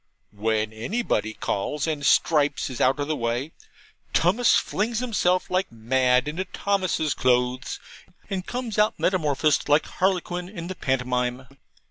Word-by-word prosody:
When 110 Hz, +1 st, -1 dB
anybody 110 Hz, -, -2 dB
calls, 140 Hz, +9 st, -2 dB
and 155 Hz, -3 st, -2 dB
Stripes 145 Hz, -2 st, +2 dB
is 125 Hz, -, -5 dB
out 130 Hz, +2 st, +3 dB
of 145 Hz, -, -1 dB
the 155 Hz, -, 0 dB
way, 120 Hz, +4 st, -2 dB, 0.6 s
Tummus 210 Hz, +8 st, +4 dB
flings 225 Hz, +3 st, 0 dB
himself 205 Hz, -8 st, 0 dB
like 185 Hz, +1 st, 0 dB
mad 125 Hz, +3 st, +2 dB
into 160 Hz, +5 st, -2 dB
Thomas's 185 Hz, -9 st, 0 dB
clothes, 125 Hz, 0 st, 0 dB, 0.5 s
and 190 Hz, -3 st, -3 dB
comes 240 Hz, -4 st, -3 dB
out 210 Hz, +1 st, +2 dB
metamorphosed 155 Hz, -5 st, +1 dB
like 145 Hz, +1 st, +4 dB
Harlequin 180 Hz, -1 st, -1 dB
in 175 Hz, -4 st, -7 dB
the 185 Hz, +2 st, -5 dB
pantomime. 125 Hz, -2 st, -1 dB
150 Hz, 135 wpm, -25 LUFS, 125-185 Hz, 0.6 s, Tummus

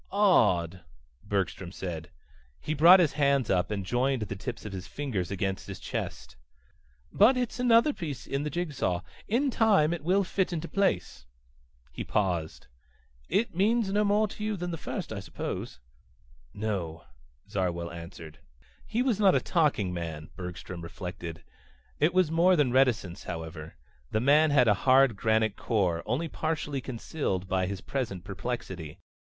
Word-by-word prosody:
"Odd," 95 Hz, -, +3 dB, 0.4 s
Bergstrom 95 Hz, -3 st, -2 dB
said. 85 Hz, -4 st, -6 dB, 0.5 s
He 155 Hz, -, -3 dB
brought 170 Hz, +5 st, +8 dB
his 165 Hz, -5 st, +3 dB
hands 140 Hz, -5 st, +2 dB
up 90 Hz, -2 st, +1 dB
and 100 Hz, -3 st, -3 dB
joined 125 Hz, +2 st, +1 dB
the 100 Hz, -1 st, -5 dB
tips 115 Hz, +5 st, -6 dB
of 105 Hz, -, -6 dB
his 95 Hz, -2 st, -6 dB
fingers 120 Hz, -12 st, -3 dB
against 95 Hz, -1 st, -3 dB
his -, -, -7 dB
chest. -, -, -5 dB, 0.8 s
"But 235 Hz, +6 st, +6 dB
it's 245 Hz, 0 st, -2 dB
another 245 Hz, +4 st, +5 dB
piece 150 Hz, -, -6 dB
in 140 Hz, -, -2 dB
the 150 Hz, -, -2 dB
jig 170 Hz, -1 st, -3 dB
saw. 90 Hz, -9 st, -1 dB, 0.3 s
In 260 Hz, +6 st, +1 dB
time 200 Hz, -10 st, +4 dB
it 170 Hz, -, -5 dB
will 190 Hz, +4 st, +3 dB
fit 190 Hz, 0 st, -1 dB
into 170 Hz, -1 st, -3 dB
place." 190 Hz, -, -1 dB, 0.6 s
He -, -, -5 dB
paused. 90 Hz, -7 st, -1 dB, 0.6 s
"It 225 Hz, -1 st, +1 dB
means 210 Hz, +2 st, +2 dB
no 210 Hz, +1 st, +3 dB
more 210 Hz, +1 st, +3 dB
to 210 Hz, -, -8 dB
you 215 Hz, -1 st, -1 dB
than 175 Hz, 0 st, -3 dB
the 165 Hz, -, -4 dB
first, 165 Hz, -, -5 dB
I 105 Hz, -, -4 dB
suppose?" 85 Hz, -8 st, -5 dB, 0.7 s
"No," 90 Hz, -, -3 dB, 0.4 s
Zarwell 85 Hz, -3 st, -2 dB
answered. 85 Hz, -2 st, -10 dB, 0.5 s
He 240 Hz, +3 st, 0 dB
was 240 Hz, -6 st, +1 dB
not 195 Hz, -3 st, +5 dB
a -, -, +4 dB
talking 145 Hz, -, +1 dB
man, 80 Hz, -3 st, -5 dB
Bergstrom 90 Hz, -1 st, -7 dB
reflected. 85 Hz, -1 st, -7 dB, 0.6 s
It 155 Hz, +4 st, +4 dB
was 185 Hz, -4 st, +2 dB
more 175 Hz, +3 st, +5 dB
than 145 Hz, -6 st, +2 dB
reticence, 120 Hz, -9 st, +1 dB
however. 80 Hz, -2 st, -7 dB, 0.3 s
The 110 Hz, -, 0 dB
man 150 Hz, +6 st, +5 dB
had 135 Hz, -4 st, +4 dB
a 105 Hz, -, +6 dB, 0.2 s
hard 130 Hz, -3 st, +6 dB
granite 110 Hz, 0 st, +1 dB
core, 90 Hz, -7 st, 0 dB
only 135 Hz, +9 st, 0 dB
partially 155 Hz, -3 st, -2 dB
concealed 115 Hz, -, -3 dB
by 95 Hz, -1 st, 0 dB
his 100 Hz, -1 st, -5 dB
present 110 Hz, -10 st, -3 dB
perplexity. 95 Hz, -6 st, -5 dB
120 Hz, 160 wpm, -28 LUFS, -, 0.8 s, brought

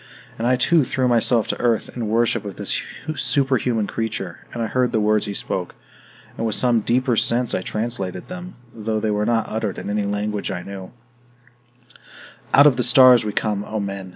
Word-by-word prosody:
And 115 Hz, -, 0 dB
I 125 Hz, -, +4 dB
too 155 Hz, +5 st, +3 dB
threw 130 Hz, 0 st, 0 dB
myself 120 Hz, -1 st, +3 dB
to -, -, -2 dB
earth, 120 Hz, -3 st, 0 dB
in 120 Hz, -3 st, -3 dB
worship 115 Hz, +2 st, +1 dB
of 100 Hz, -2 st, -7 dB
this -, -, -2 dB, 0.3 s
superhuman 130 Hz, -7 st, +1 dB
creature; 100 Hz, -6 st, -4 dB
and 115 Hz, -, -3 dB
I -, -, 0 dB
heard 125 Hz, +2 st, 0 dB
the 110 Hz, -, +2 dB
words 105 Hz, 0 st, +1 dB
he 100 Hz, -, -4 dB
spoke, 90 Hz, -2 st, -4 dB, 0.6 s
and -, -, -4 dB
with 110 Hz, -2 st, 0 dB
some 120 Hz, -2 st, +3 dB
deeper 125 Hz, +3 st, +1 dB
sense 120 Hz, +1 st, +1 dB
I -, -, 0 dB
translated 100 Hz, -4 st, -3 dB
them, 180 Hz, 0 st, -8 dB, 0.2 s
though 110 Hz, 0 st, -2 dB
they 110 Hz, 0 st, -1 dB
were 105 Hz, +1 st, 0 dB
not 115 Hz, -1 st, +1 dB
uttered 110 Hz, -3 st, -3 dB
in -, -, -5 dB
any 105 Hz, 0 st, -1 dB
language 105 Hz, 0 st, -2 dB
I 90 Hz, -2 st, -4 dB
knew: 95 Hz, -2 st, -9 dB, 1.6 s
"Out 140 Hz, -, +7 dB
of 140 Hz, -5 st, +5 dB
the 125 Hz, -, +1 dB
stars 125 Hz, 0 st, +7 dB
we 105 Hz, -, -3 dB
come, 105 Hz, -1 st, -1 dB
O 110 Hz, +1 st, -4 dB
men! 100 Hz, -2 st, -5 dB
110 Hz, 195 wpm, -21 LUFS, 105-125 Hz, 1.6 s, Out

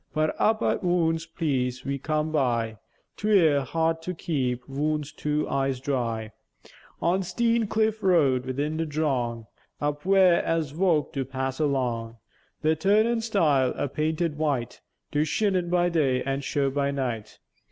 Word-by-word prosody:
But 155 Hz, 0 st, +1 dB
up 220 Hz, 0 st, +2 dB
at -, -, +1 dB
woone 170 Hz, -2 st, +2 dB, 0.2 s
pleäce 130 Hz, -5 st, -1 dB
we 140 Hz, 0 st, -2 dB
come 155 Hz, +2 st, -1 dB
by, 120 Hz, -7 st, 0 dB, 0.4 s
'Twere 175 Hz, -9 st, +4 dB
hard 165 Hz, +4 st, 0 dB
to 180 Hz, +2 st, -4 dB
keep 125 Hz, -7 st, -2 dB
woone's 150 Hz, +1 st, -2 dB
two 150 Hz, 0 st, -2 dB
eyes 135 Hz, -1 st, -1 dB
dry; 115 Hz, -5 st, -2 dB, 0.7 s
On 180 Hz, +3 st, +2 dB
Steän 230 Hz, +4 st, 0 dB
cliff 220 Hz, 0 st, +1 dB
road, 140 Hz, -10 st, +3 dB
'ithin 145 Hz, +4 st, -2 dB
the 165 Hz, 0 st, -1 dB
drong, 130 Hz, -7 st, -1 dB, 0.3 s
Up 145 Hz, 0 st, -2 dB
where, 190 Hz, -2 st, +4 dB
as 165 Hz, -4 st, -1 dB
vo'k 165 Hz, -3 st, +1 dB
do 135 Hz, -, -1 dB
pass 130 Hz, +1 st, -4 dB
along, 120 Hz, -6 st, -1 dB, 0.5 s
The 155 Hz, +1 st, +3 dB
turnèn 215 Hz, +7 st, +2 dB
stile, 155 Hz, -, +2 dB
a -, -, -1 dB
painted 155 Hz, +2 st, -1 dB
white, 135 Hz, -6 st, -1 dB, 0.3 s
Do 150 Hz, 0 st, +2 dB
sheen 185 Hz, +2 st, 0 dB
by 175 Hz, 0 st, +2 dB
day 140 Hz, -7 st, +1 dB
an' 135 Hz, +1 st, -2 dB
show 140 Hz, 0 st, 0 dB
by 140 Hz, 0 st, 0 dB
night. 125 Hz, -6 st, -3 dB
150 Hz, 150 wpm, -26 LUFS, 130-170 Hz, 0.7 s, Twere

